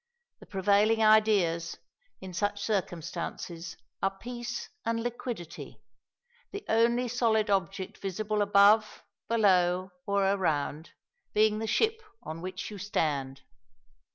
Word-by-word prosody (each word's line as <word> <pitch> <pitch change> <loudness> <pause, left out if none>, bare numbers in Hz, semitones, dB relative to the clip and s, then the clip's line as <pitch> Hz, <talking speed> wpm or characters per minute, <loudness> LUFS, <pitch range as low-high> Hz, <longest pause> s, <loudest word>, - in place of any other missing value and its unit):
The - - -15
prevailing 210 +3 +3
ideas 200 -6 +3 0.4
in 190 -1 -8
such 205 +3 -1
circumstances 175 -3 -4 0.2
are 195 0 0
peace 240 +1 -5 0.2
and 230 0 -1
liquidity! 240 -7 -6 0.7
the 400 0 -7
only 235 +2 +3
solid 225 -3 +1
object 195 0 -1
visible 210 +2 -2
above, 205 +2 +4 0.3
below, 185 -4 +3 0.2
or 200 -1 +2
around, 160 -5 0 0.5
being 215 0 +3
the 225 - -3
ship 445 - +1 0.2
on 160 +1 -6
which 185 +3 -5
you 205 - -8
stand. 140 -8 -2
200 Hz, 110 wpm, -29 LUFS, 180-220 Hz, 0.7 s, above